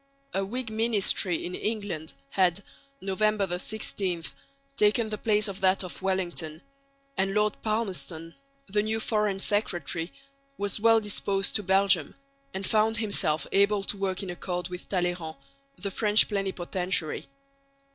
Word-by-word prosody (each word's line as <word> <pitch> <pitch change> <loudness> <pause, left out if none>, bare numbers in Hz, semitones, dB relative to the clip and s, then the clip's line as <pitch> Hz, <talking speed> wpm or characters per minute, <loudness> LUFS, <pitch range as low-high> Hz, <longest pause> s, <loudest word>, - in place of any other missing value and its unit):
A 195 - +1
Whig 225 +3 -3
ministry 215 -5 +2
in 180 - -4
England 200 -7 -3 0.2
had 185 0 +2 0.4
(November 195 -2 +1
16) 190 -4 -2 0.5
taken 215 +2 +3
the 215 - -3
place 210 -1 +2
of 195 -1 -6
that 190 0 +3
of 180 - -7
Wellington; 175 -4 -2 0.5
and 195 +1 +1
Lord 210 0 +1
Palmerston, 190 -7 -3 0.3
the 205 +1 +1
new 220 +1 -1
Foreign 210 -3 +1
Secretary, 175 -5 -1 0.5
was 200 0 0
well 225 +1 +6
disposed 200 -2 0
to 210 - +4
Belgium 195 0 +3 0.4
and 190 +1 -4
found 220 +2 +2
himself 200 -8 +2
able 200 0 +3
to 200 - -1
work 195 0 -1
in 185 - -4
accord 175 0 -3
with 180 0 -8
Talleyrand, 175 -4 -1 0.4
the 200 - -3
French 210 +1 +5
plenipotentiary. 185 -4 -1
195 Hz, 135 wpm, -28 LUFS, 180-210 Hz, 0.5 s, well